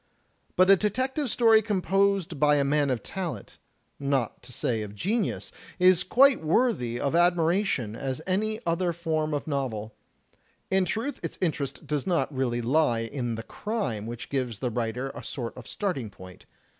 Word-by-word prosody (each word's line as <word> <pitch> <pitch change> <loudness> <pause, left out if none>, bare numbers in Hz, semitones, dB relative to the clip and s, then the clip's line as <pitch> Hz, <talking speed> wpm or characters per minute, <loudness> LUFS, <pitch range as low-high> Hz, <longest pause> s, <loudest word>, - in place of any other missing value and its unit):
But 185 +1 +6
a - - +9
detective 260 - -1
story 225 -1 +5
composed 195 -4 +1
by 150 0 +5
a 140 - +3
man 145 0 +2
of 125 -5 -1
talent, 185 -4 -5 0.4
not 140 -4 -1
to - - -14
say 115 -2 -1
of 105 -1 -7
genius, 205 - -1 0.3
is 185 -1 +5
quite 265 +7 +5
as - - -14
worthy 155 - +1
of 140 +3 -1
admiration 170 - +2
as 130 +2 -3
any 215 +4 0
other 170 +1 +1
form 160 -2 -1
of 145 -1 -2
novel. 120 -8 -3 0.8
In 190 -1 +3
truth, 230 +9 -3
its - - -5
interest 145 -6 -2
does 150 0 -2
not 170 -4 +1
really 120 -2 0
lie 120 -2 +2
in 120 0 -3
the 115 - -6
crime 130 - -3
which 120 0 -7
gives 125 -5 -1
the 125 +3 -2
writer 120 +3 -2
a - - -9
sort 120 -4 -5
of 125 - -10
starting 155 - -3
point. 95 -2 -14
150 Hz, 170 wpm, -27 LUFS, 120-190 Hz, 0.8 s, a